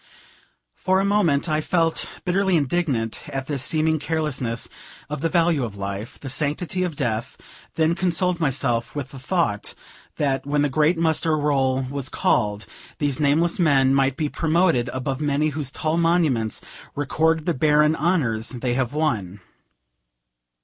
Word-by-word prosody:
For 190 +1 +1
a 195 - +1
moment 180 -8 +2
I 155 -1 +1
felt 165 0 +1 0.2
bitterly 190 0 +2
indignant 140 -7 -1
at 135 -2 -4
this 140 -2 -3
seeming 155 +4 +1
carelessness 145 -7 -2 0.4
of 150 -2 -3
the 165 - +1
value 165 -5 +2
of 105 -4 -5
life, 100 +4 -5
the 140 - -8
sanctity 150 +7 -1
of 180 -4 -1
death; 120 -3 -2 0.4
then 160 +1 +2
consoled 180 0 0
myself 135 -6 -1
with 140 -2 -4
the 135 - -9
thought 130 - -1 0.4
that, 135 -2 0
when 145 +1 0
the 145 - +1
great 155 +5 +2
muster 160 -1 +2
roll 135 -3 +1
was 135 0 -4
called, 105 -2 0 0.3
these 145 -2 -1
nameless 155 +5 +2
men 135 -5 +4
might 135 -1 +2
be 155 - 0
promoted 160 -5 +1
above 130 +2 -3
many 150 +1 +1
whose 145 -2 -4
tall 155 +3 -1
monuments 160 - +1 0.3
record 155 +2 +1
the 175 - +1
barren 150 +2 +3
honors 135 -10 0
they 125 -1 -2
have 130 0 -1
won. 105 - -1
145 Hz, 150 wpm, -23 LUFS, 130-165 Hz, 0.4 s, men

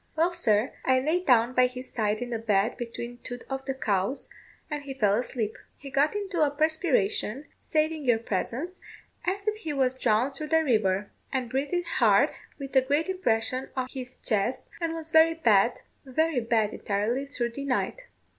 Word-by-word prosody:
Well, 335 +3 +2
sir, 220 -8 +1
I 260 0 +4
lay 310 +7 +1
down 245 -4 +4
by 255 0 +5
his 255 +1 -8
side 215 0 0
in 245 - -7
the 230 - -1
bed, 215 0 +1
between 240 0 -6
two 245 0 -7
of 270 0 -3
the 270 -1 -2
cows, 205 +1 -1 0.4
and 295 -2 -4
he 275 -1 -7
fell 210 -6 +3
asleep. 225 -1 -1 0.2
He 275 -1 -9
got 280 +7 +2
into 395 -5 -2
a 300 - +5
perspiration, 285 - 0 0.2
saving 310 -1 0
your 240 -3 +4
presence, 235 - -3 0.5
as 395 +3 -2
if 430 0 +1
he 320 -8 -4
was 260 -2 +2
drawn 235 +3 +2
through 305 +3 -6
the 320 +1 +3
river, 210 -7 +1 0.2
and 250 -3 -2
breathed 290 +7 -1
hard, 340 - +4 0.3
with 275 -1 -8
a 265 - +7
great 290 +7 0
impression 255 -7 0
on 255 -1 -2
his 255 -2 -7
chest, 215 +3 -1 0.2
and 330 -1 -1
was 320 -1 -5
very 320 +1 +6
bad 230 -7 +3 0.2
very 300 +1 +1
bad 225 -2 +1
entirely 220 +7 -1
through 240 -4 -2
the 275 +4 -6
night. 385 - -1
260 Hz, 185 wpm, -27 LUFS, 230-310 Hz, 0.5 s, a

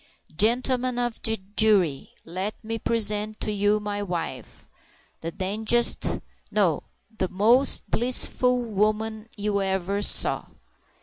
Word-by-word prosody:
"Gentlemen 250 +4 +1
of 240 -2 -2
the 225 0 0 0.2
jury! 190 -10 +3 0.2
let 185 +5 -4
me 225 +1 -4
present 215 -1 0
to 215 - -2
you 205 +1 +1
my 205 -1 -4
wife—the 175 -2 -8
dangdest 220 +5 +2
sk— - - -1 0.3
no, 190 -8 +1 0.3
the 185 -4 -2
most 235 +8 +3
blissful 250 +1 +1
woman 215 +1 -1
you 205 -1 -1
ever 190 +1 -1
saw." - - +4
215 Hz, 115 wpm, -25 LUFS, 200-225 Hz, 0.3 s, saw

